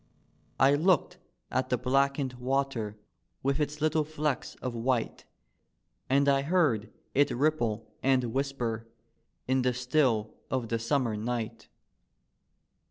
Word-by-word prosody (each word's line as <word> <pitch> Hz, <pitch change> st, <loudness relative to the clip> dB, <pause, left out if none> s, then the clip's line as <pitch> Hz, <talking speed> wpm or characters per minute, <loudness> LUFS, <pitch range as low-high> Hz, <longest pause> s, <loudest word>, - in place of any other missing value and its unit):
I 135 Hz, +2 st, +6 dB
looked 165 Hz, +2 st, +2 dB, 0.3 s
at 130 Hz, 0 st, 0 dB
the 125 Hz, -, +2 dB
blackened 135 Hz, +1 st, +1 dB
water 125 Hz, -5 st, -1 dB, 0.5 s
with 140 Hz, +2 st, +1 dB
its 150 Hz, 0 st, -2 dB
little 155 Hz, 0 st, +2 dB
flecks 150 Hz, -2 st, -2 dB
of 125 Hz, -2 st, -5 dB
white, 120 Hz, 0 st, -1 dB, 0.8 s
And 140 Hz, +2 st, +3 dB
I 140 Hz, -1 st, +4 dB
heard 140 Hz, -, +1 dB, 0.2 s
it 145 Hz, +1 st, +4 dB
ripple 120 Hz, -6 st, 0 dB, 0.2 s
and 130 Hz, -3 st, +2 dB
whisper 120 Hz, -5 st, -2 dB, 0.6 s
in 130 Hz, 0 st, +2 dB
the 125 Hz, -1 st, +1 dB
still 125 Hz, -4 st, +1 dB, 0.2 s
of 125 Hz, -4 st, -2 dB
the 115 Hz, -, 0 dB
Summer 115 Hz, -1 st, 0 dB
night. 115 Hz, +1 st, -4 dB
130 Hz, 120 wpm, -29 LUFS, 120-140 Hz, 0.8 s, I